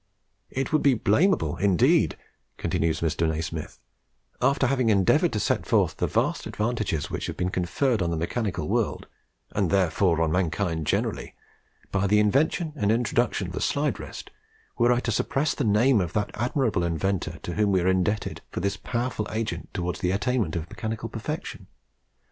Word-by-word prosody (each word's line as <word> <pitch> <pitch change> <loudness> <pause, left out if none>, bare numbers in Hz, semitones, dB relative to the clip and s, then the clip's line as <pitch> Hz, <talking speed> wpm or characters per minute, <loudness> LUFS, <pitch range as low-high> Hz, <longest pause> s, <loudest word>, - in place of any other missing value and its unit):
It 135 +4 -3
would 155 - +4
be 140 -3 +4
blamable 110 - +2
indeed," 95 -4 +3 0.4
continues 80 -1 0
Mr. 80 0 +1
Nasmyth, 80 0 -4 0.6
"after 135 +1 +3
having 130 -2 +2
endeavoured 110 - +3
to 105 - 0
set - - 0
forth - - +2
the - - 0
vast - - 0
advantages 105 -8 -2
which - - -3
have - - -5
been 90 0 -1
conferred 110 +6 0
on 85 - +1
the 85 - -1
mechanical 100 +5 -2
world, - - -1 0.5
and - - 0
therefore 90 -2 +2
on 80 - 0
mankind 85 -2 -1
generally, - - -1 0.6
by 100 0 +1
the 105 +2 +4
invention 150 - +2
and 105 -7 +1
introduction 115 -2 +1
of 90 - -7
the - - -4
Slide 145 +1 0
Rest, - - -8 0.4
were 120 0 +3
I 120 0 +2
to 120 - -2
suppress 135 +6 0
the 140 - -2
name 110 +2 +4
of 90 -1 -3
that 105 -2 -1
admirable 120 -4 0
individual 85 -1 -1
to 90 - -4
whom 105 +1 +2
we 95 -2 +3
are 90 - 0
indebted 95 +3 0
for - - -4
this 100 +2 -1
powerful 120 -3 -2
agent 110 0 -3
towards 90 -4 -3
the 90 - 0
attainment 105 -1 0
of 85 -1 -3
mechanical 110 0 -4
perfection. - - -5
100 Hz, 170 wpm, -26 LUFS, 85-120 Hz, 0.6 s, would